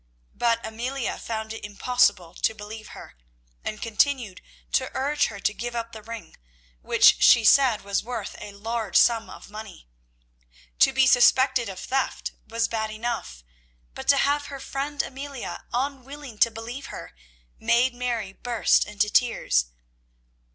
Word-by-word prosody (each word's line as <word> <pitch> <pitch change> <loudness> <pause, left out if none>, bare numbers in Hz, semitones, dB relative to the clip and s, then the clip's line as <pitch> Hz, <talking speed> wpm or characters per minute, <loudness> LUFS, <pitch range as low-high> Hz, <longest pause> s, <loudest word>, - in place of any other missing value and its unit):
But 230 -1 +1
Amelia 240 +4 -3
found 220 -1 -4
it 225 - -9
impossible 205 -4 +1
to 220 - 0
believe 215 +1 -9
her, - - -12 0.5
and 215 - -4
continued 230 -3 0 0.3
to 260 - +1
urge 280 +3 +1
her 200 - -8
to 215 - 0
give 240 +2 -5
up 230 0 -3
the 220 - -9
ring, 230 +1 -9 0.4
which - - +5
she 230 - +7
said 255 -4 +5
was 200 0 -1
worth 230 -3 -5
a 210 - -7
large 220 -1 -4
sum 230 -2 +4
of - - -12
money. 215 - -10 0.9
To - - +6
be 265 +1 +4
suspected 255 -1 +4
of 190 -1 -7
theft 270 +1 -2 0.2
was 230 +1 0
bad 220 -1 -2
enough, 215 - -4 0.5
but - - -8
to 280 - +6
have 285 +1 +1
her 275 -1 -7
friend 280 +2 -3
Amelia 275 -1 -7
unwilling 270 -1 -4
to 230 - +6
believe 235 +5 -7
her, 85 - -9 0.5
made 245 +2 +3
Mary 240 -5 -3
burst 240 +1 +2
into 210 0 0
tears. 210 - +2
230 Hz, 150 wpm, -25 LUFS, 215-260 Hz, 0.9 s, she